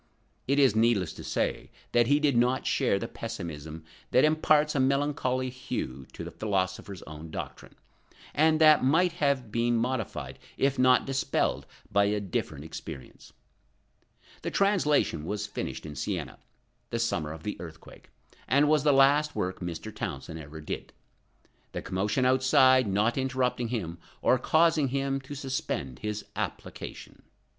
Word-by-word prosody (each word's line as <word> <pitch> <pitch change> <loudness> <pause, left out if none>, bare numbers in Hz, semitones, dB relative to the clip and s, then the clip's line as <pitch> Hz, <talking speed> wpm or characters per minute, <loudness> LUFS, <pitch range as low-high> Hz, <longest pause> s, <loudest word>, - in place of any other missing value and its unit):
It 140 +2 +2
is 135 -7 +5
needless 110 -7 +2
to - - -10
say - - -2 0.2
that 120 -1 +4
he 145 +1 +4
did 145 -4 +2
not 125 +2 +2
share 130 -7 +2
the 115 - -4
pessimism 80 -10 -7 0.3
that 130 - +4
imparts 155 -1 +3
a 140 - 0
melancholy 130 -1 +1
hue 65 - -5
to - - -7
the - - -7
philosopher's 95 -2 -2
own 80 +1 -9
doctrine, - - -7 0.6
and 155 +1 +3
that 155 -3 +7
might 165 +7 +4
have 140 -8 0
been 120 +1 +1
modified 110 - -3 0.2
if 135 -1 +1
not 130 0 +5
dispelled 135 -1 0 0.2
by 100 0 +4
a 105 +1 +1
different 80 -6 -4
experience. 80 -3 -9 1.1
The - - -3
translation 150 - +2
was 105 +5 -3
finished 105 - -5
at 75 -3 -7
Siena, - - -4 0.5
the 115 - -2
summer 85 -10 -1
of 80 0 -9
the 105 - -3
earthquake, 80 -2 -12 0.4
and 140 +4 +4
was 150 0 +4
the 150 - +5
last 145 +3 +4
work 95 0 -2
Mr. 90 +5 -6
Townsend 80 -5 -5
ever 75 0 -9
did, 75 - -6 0.8
the - - -3
commotion 105 +7 0
outside 130 -1 +5
not 105 +6 +1
interrupting 130 -2 0
him, 90 -8 -4 0.2
or 125 - +4
causing 160 +1 +3
him 135 +1 -1
to 135 +2 -8
suspend 130 - -3
his 105 0 -4
application. - - -6
120 Hz, 150 wpm, -28 LUFS, 95-140 Hz, 1.1 s, that